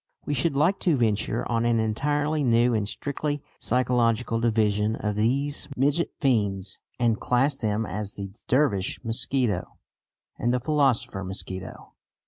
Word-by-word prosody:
We 145 - -1
should 140 +2 +1
like 165 +8 +2
to 165 -6 +2
venture 110 -1 0
on 115 -1 0
an 120 -1 +2
entirely 145 +7 0
new 120 -1 +3
and 105 -2 0
strictly 145 +2 -3 0.2
psychological 120 -1 +1
division 110 -2 +1
of 105 -2 -2
these 135 +7 0
midget 145 +6 +2
fiends, 100 -8 0 0.2
and 120 -2 +1
class 135 +3 +2
them 110 -1 -1
as 100 +2 -4
"the 100 -1 -6
Dervish 125 -8 +1
mosquito" 120 -3 -1 0.6
and 120 - +1
"the 125 - +1
philosopher 125 -7 +1
mosquito." 95 0 -7
120 Hz, 135 wpm, -26 LUFS, 105-140 Hz, 0.6 s, new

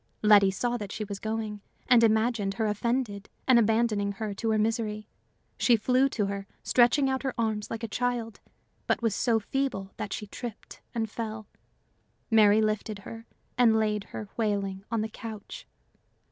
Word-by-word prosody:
Letty 205 -2 +7
saw 240 +5 -1
that 205 -3 -6
she 215 - -4
was 200 -1 -6
going, 220 -1 -3 0.3
and 245 -2 +6
imagined 220 -2 +2
her 225 - 0
offended 210 -1 -1 0.2
and 255 -2 +7
abandoning 220 -2 +2
her 210 +1 -4
to 225 +3 -2
her 220 - +2
misery. 215 -1 -1 0.5
She 240 - +5
flew 255 +4 +2
to 215 -6 -1
her, 200 0 -4 0.2
stretching 250 +3 +4
out 265 0 0
her 265 -2 -3
arms 220 -2 -1
like 225 0 -5
a - - -1
child, 235 -1 -2 0.5
but - - +1
was 225 -3 +2
so 230 +1 +2
feeble 225 -5 -2
that 200 - -5
she 210 - -4
tripped 230 +2 -8
and 225 -1 0
fell. 220 0 -5 0.9
Mary 215 -1 +6
lifted 215 0 -1
her, 225 0 -9 0.3
and 230 -3 +5
laid 210 -2 0
her 210 - -7
wailing 200 -3 -1
on 230 -2 0
her - - -2
couch. 220 -1 -9
220 Hz, 170 wpm, -28 LUFS, 210-235 Hz, 0.9 s, Letty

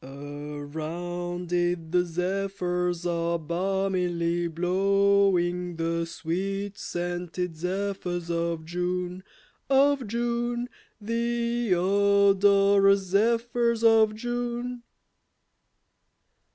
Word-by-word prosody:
Around 155 +6 -6
it 175 -2 0
the 180 0 +3
zephyrs 180 0 -2
are 170 0 0
balmily 175 0 -1
blowing, 180 0 +2
The 165 0 -1
sweet 195 +5 -3
scented 175 0 -4
zephyrs 180 0 -3
of 170 -1 -2
June, 180 +1 -3 0.5
Of 275 -2 +3
June, 240 +2 -1 0.3
The 235 -1 0
odorous 200 +1 +4
zephyrs 235 +2 +1
of 220 -1 +5
June. 240 +1 -3
180 Hz, 75 wpm, -26 LUFS, 175-205 Hz, 0.5 s, of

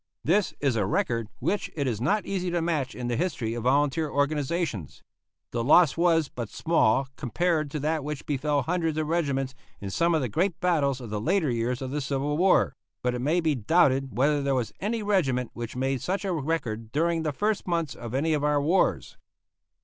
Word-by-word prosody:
This 195 +4 +2
is 140 -4 +1
a 105 -4 +1
record 115 +2 0
which 205 - -1
it 145 -3 -1
is 115 -4 -2
not 205 - +1
easy 185 -2 -2
to 175 0 0
match 155 -5 -1
in 125 -1 -4
the 120 - 0
history 120 -7 -1
of 120 0 -5
volunteer 145 +4 +2
organizations. 145 - -1 0.5
The 115 -1 -1
loss 150 +3 +5
was 165 -2 +3
but 120 -4 -6
small 135 -5 +2
compared 155 +3 0
to 150 - -4
that 155 0 0
which 150 -1 -5
befell 145 0 0
hundreds 165 +1 -1
of 155 - 0
regiments 140 -5 -1 0.3
in 100 -1 -6
some 170 - +2
of 155 - +1
the 130 - 0
great 175 - 0
battles 140 -7 +1
of 115 -4 -8
the 105 -1 -2
later 165 - +1
years 120 +2 -1
of 130 - -4
the 150 +1 -2
Civil 140 +2 -1
War; 185 +4 +3 0.3
but 125 0 +1
it 125 - -3
may 160 +7 +2
be 160 -2 +2
doubted 135 - +2
whether 145 +3 +3
there 140 -1 +1
was 120 -4 -2
any 220 +2 -2
regiment 135 - +1
which 120 0 -6
made 130 0 -1
such 195 +2 -2
a 190 - 0
record 135 -8 -2
during 165 +3 +1
the 155 -1 -1
first 210 +8 -1
months 170 -4 -1
of 120 +1 -7
any 155 +4 +1
of 150 -1 0
our 150 0 +2
wars. 160 +7 +1
145 Hz, 205 wpm, -27 LUFS, 125-170 Hz, 0.5 s, loss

